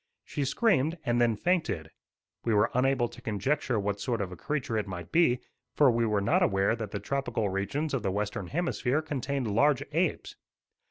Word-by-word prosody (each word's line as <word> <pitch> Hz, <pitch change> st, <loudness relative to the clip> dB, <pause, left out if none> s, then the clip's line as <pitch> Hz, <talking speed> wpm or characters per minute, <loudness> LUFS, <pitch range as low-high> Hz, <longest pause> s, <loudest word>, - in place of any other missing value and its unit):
She 145 Hz, -, -3 dB
screamed 160 Hz, -, +2 dB
and 120 Hz, -1 st, +2 dB
then 115 Hz, -2 st, +3 dB
fainted. 155 Hz, -, -1 dB, 0.5 s
We 115 Hz, -2 st, +1 dB
were 105 Hz, +2 st, +3 dB
unable 130 Hz, -1 st, +2 dB
to -, -, -13 dB
conjecture 120 Hz, +3 st, 0 dB
what 100 Hz, 0 st, -2 dB
sort 120 Hz, -3 st, -1 dB
of 95 Hz, -3 st, -3 dB
a -, -, -6 dB
creature 130 Hz, -, -3 dB
it 105 Hz, -2 st, -1 dB
might 90 Hz, -3 st, -7 dB
be, 125 Hz, -8 st, +3 dB, 0.3 s
for 145 Hz, -4 st, +6 dB
we 115 Hz, 0 st, +1 dB
were 105 Hz, -2 st, +1 dB
not 100 Hz, -, +2 dB
aware 95 Hz, +3 st, +2 dB
that 110 Hz, -3 st, -5 dB
the 100 Hz, -, -4 dB
tropical 135 Hz, -6 st, -1 dB
regions 135 Hz, +11 st, -2 dB
of 135 Hz, -, 0 dB
the 100 Hz, -, -1 dB
Western 100 Hz, -1 st, -2 dB
Hemisphere 155 Hz, -, 0 dB
contained 135 Hz, -6 st, -2 dB
large 140 Hz, +4 st, +3 dB
apes. 165 Hz, +2 st, -1 dB
120 Hz, 185 wpm, -29 LUFS, 105-145 Hz, 0.5 s, for